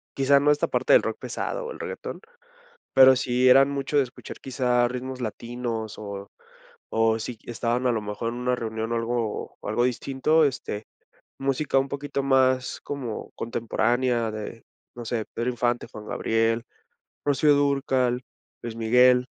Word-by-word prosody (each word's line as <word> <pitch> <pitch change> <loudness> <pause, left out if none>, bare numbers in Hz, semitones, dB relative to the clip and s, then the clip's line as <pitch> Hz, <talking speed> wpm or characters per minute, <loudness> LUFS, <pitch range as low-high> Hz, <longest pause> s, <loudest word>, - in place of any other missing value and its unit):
quizá 140 +1 +4
no 145 +1 +2
esta 150 0 +3
parte - - +2
del - - +7
rock - - -2
pesado - - -4
o - - -6
el - - -9
reguetón, - - -6 0.8
pero 130 0 +9
sí 125 -1 +1
eran 135 +2 +7
mucho 140 +1 -1
de 140 - +5
escuchar 125 - -10
quizá 125 -2 +1
ritmos 125 +1 -5
latinos 115 -1 -4
o 100 -1 -7 0.6
o 115 0 +2
si 115 +1 -5
estaban 120 +1 -1
a 125 - +3
lo 110 - 0
mejor 105 +2 -3
en - - -6
una 125 0 +1
reunión 110 -1 -4
o 115 - 0
algo 115 -1 -2
o - - -7
algo 115 +3 +1
distinto, 135 +5 +2
este, 110 -6 -3 0.5
música 135 +1 0
un 135 - -3
poquito 140 0 -3
más 130 -1 +2
como 130 -6 -5
contemporánea 120 +1 0
de 110 +1 -7 0.3
no 120 - -6
sé, 115 -1 -2
Pedro 120 +2 -1
Infante, 120 0 -1
Juan 105 0 -9
Gabriel, 115 +1 0 0.6
Rocío 145 +1 +4
Dúrcal, 135 -3 +1 0.4
Luis 115 -1 -6
Miguel. 125 +2 +4
125 Hz, 160 wpm, -25 LUFS, 115-135 Hz, 0.8 s, pero